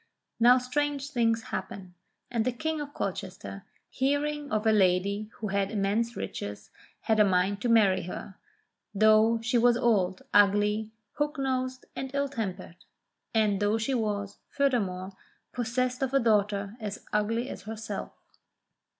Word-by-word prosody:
Now 245 Hz, +2 st, +7 dB
strange 285 Hz, +2 st, -2 dB
things 230 Hz, -3 st, +1 dB
happen, 185 Hz, -2 st, -5 dB, 0.4 s
and 230 Hz, -2 st, +1 dB
the 255 Hz, -, 0 dB
King 315 Hz, +5 st, -3 dB
of 290 Hz, -1 st, -6 dB
Colchester, 180 Hz, -, -5 dB, 0.2 s
hearing 285 Hz, +2 st, -1 dB
of 215 Hz, 0 st, 0 dB
a 220 Hz, -, +5 dB
lady 200 Hz, +1 st, +2 dB
who 215 Hz, -, -5 dB
had 200 Hz, 0 st, 0 dB
immense 215 Hz, +3 st, 0 dB
riches, 105 Hz, 0 st, -6 dB, 0.3 s
had 220 Hz, -1 st, +1 dB
a -, -, +8 dB
mind 195 Hz, +1 st, +1 dB
to 245 Hz, -, 0 dB
marry 210 Hz, -5 st, +4 dB
her, 190 Hz, +2 st, -7 dB, 0.6 s
though 215 Hz, +2 st, +5 dB
she 245 Hz, +1 st, +2 dB
was 240 Hz, 0 st, +4 dB
old, 195 Hz, -6 st, +1 dB
ugly, 205 Hz, +1 st, +3 dB, 0.3 s
hook 295 Hz, +1 st, 0 dB
nosed, 255 Hz, -1 st, -2 dB
and 265 Hz, -, -4 dB
ill 280 Hz, 0 st, 0 dB
tempered; 200 Hz, -8 st, -5 dB, 0.6 s
and 210 Hz, -3 st, +3 dB
though 205 Hz, +1 st, +2 dB
she 225 Hz, +5 st, -1 dB
was, 205 Hz, -4 st, -2 dB
furthermore, 200 Hz, -9 st, 0 dB, 0.4 s
possessed 250 Hz, +2 st, -1 dB
of 270 Hz, 0 st, 0 dB
a -, -, +6 dB
daughter 205 Hz, -3 st, +1 dB
as 210 Hz, -2 st, -6 dB
ugly 225 Hz, +4 st, 0 dB
as 195 Hz, -, -7 dB
herself. 220 Hz, 0 st, -5 dB
220 Hz, 145 wpm, -28 LUFS, 200-250 Hz, 0.6 s, a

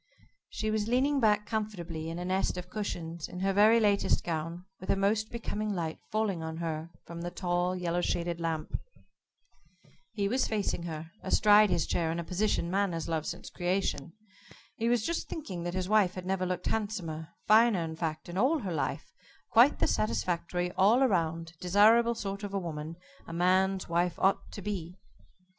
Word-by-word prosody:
She 215 Hz, 0 st, -2 dB
was 215 Hz, -1 st, 0 dB
leaning 270 Hz, +4 st, +2 dB
back 210 Hz, -3 st, +3 dB
comfortably 180 Hz, -8 st, -4 dB
in 165 Hz, -, -5 dB
a 180 Hz, -, -4 dB
nest 185 Hz, 0 st, 0 dB
of 180 Hz, 0 st, -7 dB
cushions, 170 Hz, -6 st, -4 dB
in 180 Hz, 0 st, -7 dB
her 195 Hz, 0 st, +1 dB
very 215 Hz, +3 st, +6 dB
latest 205 Hz, -2 st, +2 dB
gown, 165 Hz, +2 st, -4 dB
with 185 Hz, -, -10 dB
a -, -, +4 dB
most 210 Hz, +2 st, +1 dB
becoming 215 Hz, -2 st, -3 dB
light 165 Hz, -3 st, -3 dB
falling 215 Hz, -5 st, 0 dB
on 160 Hz, 0 st, -5 dB
her 165 Hz, -1 st, -3 dB, 0.2 s
from 170 Hz, 0 st, -7 dB
the 175 Hz, -, -3 dB
tall, 175 Hz, 0 st, -1 dB
yellow 175 Hz, -1 st, -1 dB
shaded 170 Hz, -1 st, -1 dB
lamp. 165 Hz, -2 st, -2 dB, 1.3 s
He 200 Hz, -2 st, 0 dB
was 255 Hz, +5 st, +1 dB
facing 205 Hz, -5 st, -1 dB
her 160 Hz, -1 st, -6 dB
astride 210 Hz, 0 st, +5 dB
his 175 Hz, -2 st, +1 dB
chair, 165 Hz, -2 st, 0 dB
in 165 Hz, -, -2 dB
a 170 Hz, -, -2 dB
position 180 Hz, -1 st, 0 dB
man 195 Hz, -1 st, +1 dB
has 165 Hz, -1 st, -3 dB
loved 160 Hz, -2 st, -2 dB
since -, -, -6 dB
creation. 175 Hz, -4 st, -1 dB, 0.6 s
He 230 Hz, +1 st, 0 dB
was 240 Hz, -3 st, +2 dB
just 335 Hz, 0 st, -2 dB
thinking 195 Hz, -, -5 dB
that 175 Hz, +1 st, -3 dB
his 185 Hz, -1 st, -1 dB
wife 205 Hz, -3 st, +3 dB
had 185 Hz, -1 st, -6 dB
never 185 Hz, -1 st, 0 dB
looked 180 Hz, -1 st, -3 dB
handsomer, 185 Hz, -8 st, -2 dB, 0.2 s
finer, 215 Hz, -4 st, +5 dB
in 160 Hz, 0 st, -5 dB
fact, 160 Hz, -1 st, -3 dB
in 175 Hz, +2 st, -4 dB
all 275 Hz, +9 st, +3 dB
her 185 Hz, -5 st, -3 dB
life 155 Hz, -, -3 dB, 0.4 s
quite -, -, +6 dB
the -, -, +2 dB
satisfactory, 170 Hz, +11 st, -1 dB
all 220 Hz, +9 st, +4 dB
round, 165 Hz, -4 st, -1 dB
desirable 220 Hz, +6 st, +5 dB
sort 200 Hz, -2 st, -4 dB
of 200 Hz, -1 st, -5 dB
a -, -, +1 dB
woman 160 Hz, -2 st, -5 dB, 0.3 s
a 165 Hz, -, -7 dB
man's 185 Hz, +2 st, +2 dB
wife 170 Hz, 0 st, 0 dB
ought 195 Hz, +1 st, +1 dB
to 200 Hz, -, -7 dB
be. 180 Hz, -3 st, -4 dB
180 Hz, 185 wpm, -30 LUFS, 170-210 Hz, 1.3 s, very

